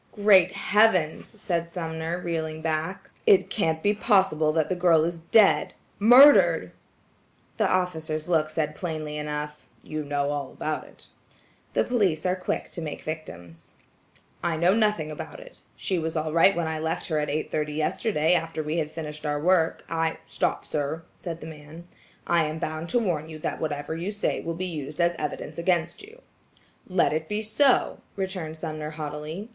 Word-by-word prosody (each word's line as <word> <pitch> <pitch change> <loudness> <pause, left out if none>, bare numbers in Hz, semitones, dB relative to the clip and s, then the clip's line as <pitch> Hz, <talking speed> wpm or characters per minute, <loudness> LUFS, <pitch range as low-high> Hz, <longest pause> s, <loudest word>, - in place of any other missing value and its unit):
"Great 195 -4 +5
heavens!" 205 -2 +2
said 170 -3 -2
Sumner 165 -1 -4
reeling 160 -2 -3
back, 160 +3 -2 0.2
"it 195 - +5
can't 160 -6 0
be 205 - +3
possible 190 -8 +3
that 160 -1 +1
the 185 - -1
girl 175 -3 +4
is 170 0 -2
dead–murdered!" 225 - +5 0.9
The 215 -4 +2
officer's 160 -4 -1
look 160 -3 +2
said 155 -1 -1
plainly 155 -2 -4
enough,–"you 150 +1 -6
know 145 0 -1
all 145 -2 -4
about 155 0 -3
it." - - -17 0.7
The - - +3
police 195 -11 +1
are 180 0 +2
quick 185 - -3
to 170 - -5
make 155 -2 -6
victims. 90 - -8 0.7
"I 170 -2 0
know 175 +3 +4
nothing 210 -8 +1
about 150 - -7
it. - - -14
She 185 -3 -1
was 160 0 -3
all 155 -1 -1
right 170 +4 +5
when 170 -1 -1
I 160 0 -2
left 160 +3 -2
her 155 -2 +1
at 150 - -2
eight 155 +2 -3
yesterday 155 +3 0
after 165 -2 -1
we 155 +2 -2
had 155 -2 -1
finished 150 -1 -7
our 145 -1 -1
work. 165 0 +2
I–" 165 0 -1
"Stop, - - -1
sir," 150 +2 -3
said 170 -2 -7
the - - -7
man. 155 +1 -10 0.4
"I 170 -2 +3
am 155 +1 -3
bound 160 +1 -4
to 245 - +2
warn 170 -9 -1
you 155 - -7
that 155 - -4
whatever 150 0 -3
you 175 +5 -3
say 205 0 -1
will 165 0 -4
be 185 +2 -3
used 150 -3 -6
as 170 0 +3
evidence 150 +2 -4
against 170 -1 0
you." 450 +5 -15 0.6
"Let 185 -4 +2
it 160 0 -3
be 210 +1 -1
so," 250 +5 +2 0.2
returned 185 -5 -4
Sumner 155 -1 -5
haughtily. 155 +6 -6
160 Hz, 170 wpm, -26 LUFS, 155-185 Hz, 0.9 s, Great